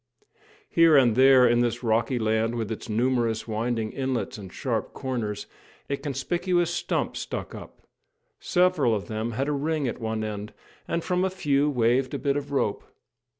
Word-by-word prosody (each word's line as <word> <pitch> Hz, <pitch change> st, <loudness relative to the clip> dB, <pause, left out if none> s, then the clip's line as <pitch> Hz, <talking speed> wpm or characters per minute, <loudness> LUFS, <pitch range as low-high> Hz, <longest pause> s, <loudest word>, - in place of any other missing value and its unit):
Here 165 Hz, -3 st, +5 dB
and 120 Hz, -5 st, +4 dB
there 130 Hz, 0 st, +7 dB
in 120 Hz, 0 st, +3 dB
this 120 Hz, +1 st, -1 dB
rocky 115 Hz, +3 st, +1 dB
land 110 Hz, +1 st, 0 dB
with 115 Hz, -2 st, -3 dB
its 110 Hz, -, -6 dB
numerous 115 Hz, 0 st, 0 dB
winding 110 Hz, 0 st, -2 dB
inlets 130 Hz, -3 st, -2 dB
and 95 Hz, -2 st, -9 dB
sharp -, -, -3 dB
corners, 115 Hz, -6 st, -3 dB, 0.5 s
a -, -, +2 dB
conspicuous 175 Hz, +6 st, -1 dB
stump -, -, -1 dB
stuck -, -, -5 dB
up. -, -, -11 dB, 0.5 s
Several 175 Hz, -, +2 dB
of 100 Hz, -, -4 dB
them 110 Hz, +1 st, -3 dB
had 135 Hz, +5 st, -1 dB
a -, -, 0 dB
ring 150 Hz, 0 st, -1 dB
at 120 Hz, -, -4 dB
one 110 Hz, -1 st, -2 dB
end, 105 Hz, -1 st, -5 dB, 0.3 s
and 170 Hz, 0 st, -1 dB
from 180 Hz, 0 st, 0 dB
a 190 Hz, -, +2 dB
few 150 Hz, -6 st, +1 dB
waved 125 Hz, 0 st, +1 dB
a -, -, 0 dB
bit 140 Hz, -2 st, 0 dB
of 145 Hz, 0 st, -4 dB
rope. 110 Hz, -7 st, 0 dB
125 Hz, 170 wpm, -26 LUFS, 110-145 Hz, 0.5 s, there